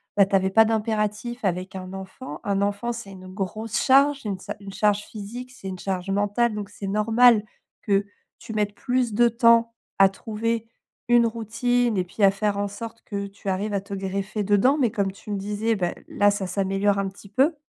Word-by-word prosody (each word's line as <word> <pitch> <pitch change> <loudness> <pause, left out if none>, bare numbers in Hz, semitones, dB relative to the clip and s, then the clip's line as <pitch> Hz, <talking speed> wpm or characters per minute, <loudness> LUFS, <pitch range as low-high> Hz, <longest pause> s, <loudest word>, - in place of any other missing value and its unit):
bah, 200 -1 +6
t'avais 190 -1 +2
pas 225 +3 +6
d'impératif 220 +1 -1
avec 185 0 -2
un 185 0 -6
enfant. 190 +7 -8
Un 200 -2 0
enfant, 205 +4 -1
c'est 225 -4 -8
une 185 -1 -11
grosse 210 +3 -4
charge, 275 +1 +4
une 195 -3 -3
sa - - -6
une 200 - -8
charge 210 0 +2
physique, 235 +4 -8
c'est 225 -6 -10
une 185 -1 -5
charge 190 -1 -3
mentale 205 +4 +1
donc 205 -1 -5
c'est 205 -1 -7
normal 220 +2 +4 0.4
que 200 0 +1 0.3
tu 225 - -8
mettes 205 -1 -1
plus 250 -2 0
de 235 +2 +4
temps 230 0 +4 0.2
à 195 0 +7
trouver 225 +3 -3 0.4
une 240 -1 +5
routine 230 0 0
et 185 - +2
puis 180 +4 -9
à 195 - +8
faire 200 +1 -1
en 205 - 0
sorte 225 +3 -8
que 200 -1 -4
tu 200 0 -7
arrives 200 +3 -1
à 195 - 0
te 200 0 -9
greffer 195 +2 -3
dedans, 205 +8 +3
mais 240 -5 +2
comme 200 -4 0
tu 205 +2 -10
me 200 - -1
disais, 210 +3 -1
ben 180 -4 -1
là 205 0 +3
ça 200 -1 -1
s'améliore 195 +2 +1
un 195 - 0
petit 195 +1 -15
peu. 275 +10 +2
205 Hz, 205 wpm, -24 LUFS, 195-230 Hz, 0.4 s, à